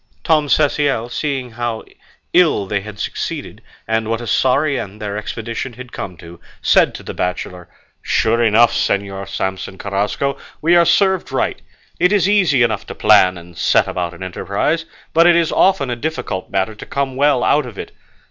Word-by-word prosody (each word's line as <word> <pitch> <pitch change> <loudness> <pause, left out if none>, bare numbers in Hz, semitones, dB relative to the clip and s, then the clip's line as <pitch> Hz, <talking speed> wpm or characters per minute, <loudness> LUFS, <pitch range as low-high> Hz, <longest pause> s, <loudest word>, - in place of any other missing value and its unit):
Tom 155 -2 +2
Cecial, 140 -6 +1
seeing 135 -2 -3
how 115 -1 -3 0.5
ill 165 - +4
they 100 +1 -2
had 105 +1 -10
succeeded, - - -5 0.3
and 110 0 0
what 115 0 -1
a 120 - -7
sorry 135 +4 +2
end 100 +2 -7
their 105 -1 -4
expedition 115 +4 -5
had 125 +1 -11
come 90 -3 -6
to, 85 +1 -12 0.2
said - - +3
to - - -9
the - - -6
bachelor, 90 -1 -4 0.3
"Sure 115 +1 +1
enough, 115 +1 +4
Señor 100 -1 -1
Samson 95 0 -4
Carrasco, 105 +9 -2 0.2
we 170 +3 +3
are 170 -1 +6
served 190 -1 +2
right; - - -1 0.4
it 180 +2 +3
is 200 -3 +3
easy 185 -11 +3
enough 110 -3 -1
to - - -7
plan 100 -4 +4
and 85 0 -13
set - - +2
about 85 -1 -3
an - - -8
enterprise, 100 - -2 0.3
but 165 +2 +5
it 175 - +6
is 170 -2 +2
often 185 -10 +2
a - - -1
difficult 120 -8 -4
matter 95 +2 -1
to 110 - -10
come 140 -2 -2
well 140 -2 +2
out 145 -3 +2
of 110 -5 -11
it. - - -7
115 Hz, 180 wpm, -18 LUFS, 100-145 Hz, 0.5 s, are